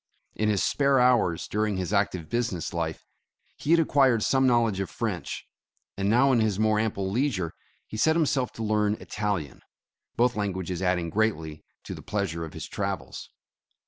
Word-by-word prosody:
In 105 0 0
his 105 -3 +1
spare 140 -2 +3
hours 120 -9 +3
during 105 -1 -1
his 95 +2 -3
active 95 -5 0
business 115 -5 -2
life, 80 -2 -3 0.5
he - - -7
had 170 +1 +6
ac 165 - +3
quired 130 -7 +3
some 135 -1 +3
knowledge 115 -5 +2
of 95 - -2
French, - - -4 0.5
and 100 0 -1
now 125 +5 +4
in 125 - +3
his 110 -3 +1
more 110 0 +2
ample 100 -3 -1
leisure, 110 - 0 0.3
he 110 - -8
set 160 +8 +3
himself 140 -7 +1
to 115 - -5
learn 105 -1 +1
Italian, 100 - -3 0.5
both 120 +1 +2
languages 95 -3 -3
adding 90 -3 0
greatly 80 -8 -1 0.2
to - - -6
the - - -9
pleasure 95 -6 -2
of 80 - -7
his - - -6
travels. - - -4
105 Hz, 175 wpm, -27 LUFS, 95-120 Hz, 0.5 s, had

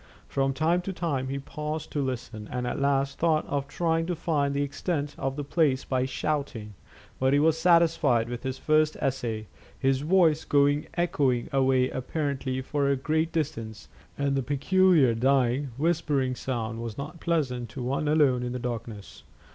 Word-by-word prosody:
From 135 0 0
time 160 +6 +1
to 190 +2 -5
time 145 -8 -2
he 135 +1 -3
paused 150 +2 -5
to 145 - -1
listen, 125 -5 -4
and 125 0 -2
at 120 - -2
last 140 0 +1
thought 160 -2 +2
of 140 -1 -2
trying 165 0 0
to 180 - -1
find 150 -4 0
the 140 - +1
extent 145 +1 -3
of 135 0 -2
the 145 - -3
place 140 -3 +1
by 130 -1 0
shouting; 130 -6 -3 0.5
but 130 +1 +2
he 145 - +4
was 155 +1 +4
satisfied 165 -8 +3
with 120 0 -5
his 130 0 -4
first 155 +1 +2
essay, 120 -5 -2 0.3
his 135 0 +1
voice 160 -1 +3
going 145 0 +2
echoing 140 -8 +1
away 130 -1 +3
apparently 130 -1 -2
for 140 +1 0
a 140 - +3
great 155 +4 0
distance, 135 -9 -4 0.3
and 140 -1 0
the 135 - +1
peculiar, 145 +1 +3
dying, 130 +2 +2
whispering 150 -4 +1
sound 115 -3 -4
was 115 -2 -6
not 150 +5 -7
pleasant 130 -9 -1
to 125 - -6
one 140 +4 -1
alone 145 -5 +3
in 125 0 -3
the - - -2
darkness. 115 -4 -6
140 Hz, 170 wpm, -27 LUFS, 130-155 Hz, 0.5 s, he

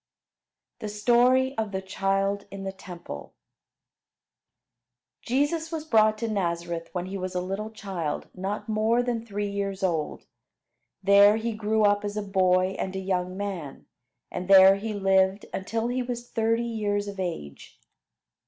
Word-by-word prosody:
THE 215 - -5
STORY 245 +5 +3
OF 215 -2 -2
THE 190 -1 -2
CHILD 195 +1 -1
IN 195 0 -7
THE 195 - -3
TEMPLE 180 -2 -9 1.9
Jesus 290 +6 0
was 315 -2 -4
brought 215 -6 +4
to 230 +1 -2
Nazareth 170 -4 -2
when 180 -1 -3
he 195 +1 -5
was 185 0 -4
a - - +1
little 195 +4 -4
child 190 -8 -4
not 195 +4 -4
more 220 +2 +2
than 240 -2 -2
three 205 -2 -3
years 195 -1 -3
old; 165 -5 -1 0.8
there 200 +2 +7
he 225 +1 -2
grew 215 0 0
up 205 0 +3
as 205 0 -4
a 210 - -1
boy 185 -1 +2
and 190 0 -3
a - - -2
young 185 -1 -2
man, 185 -9 -5 0.5
and 180 - -4
there 195 0 +8
he 215 +2 -4
lived 195 0 +2
until 225 +4 -2
he 255 +1 -1
was 245 -1 -5
thirty 230 +1 +1
years 205 -3 -1
of 200 -1 -7
age. 165 - -6
200 Hz, 155 wpm, -26 LUFS, 190-220 Hz, 1.9 s, there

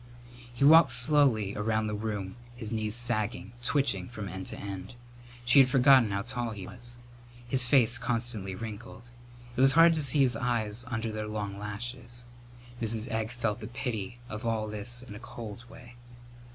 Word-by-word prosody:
He 120 +3 0
walked 160 +3 +8
slowly 125 -6 +3
along 110 +1 -1
the 105 - -3
room, 105 -2 -4 0.2
his 115 -2 -6
knees 110 -1 -1
sagging, 120 -3 -2
twitching 140 +3 0
from 105 -4 -7
end 95 0 -7
to - - -6
end. 100 +2 -7 0.5
She 125 +3 +6
had 130 -1 +6
forgotten 130 -3 +5
how 100 0 -2
tall 120 -1 -3
he 100 -4 -7
was. 120 +2 -7 0.5
His 125 0 +4
face 120 -2 +4
constantly 115 -5 -2
wrinkled. 115 +2 -9 0.4
It - - 0
was 135 0 +6
hard 165 +3 +7
to 160 - 0
see 140 +1 +4
his 125 -3 +3
eyes 115 -2 -2
under 115 -2 -3
their 110 0 -4
long 105 -2 -5
lashes. 120 +3 -6 0.6
Mrs. 110 0 -1
Egg 110 0 -1
felt 115 -2 -2
the 110 - -7
pity 115 -3 -4
of 110 0 -7
all 110 -2 -1
this 110 +4 0
in 120 -5 -10
a 105 - -9
cold 115 -1 -9
way. 120 -1 -14
115 Hz, 175 wpm, -29 LUFS, 105-125 Hz, 0.6 s, walked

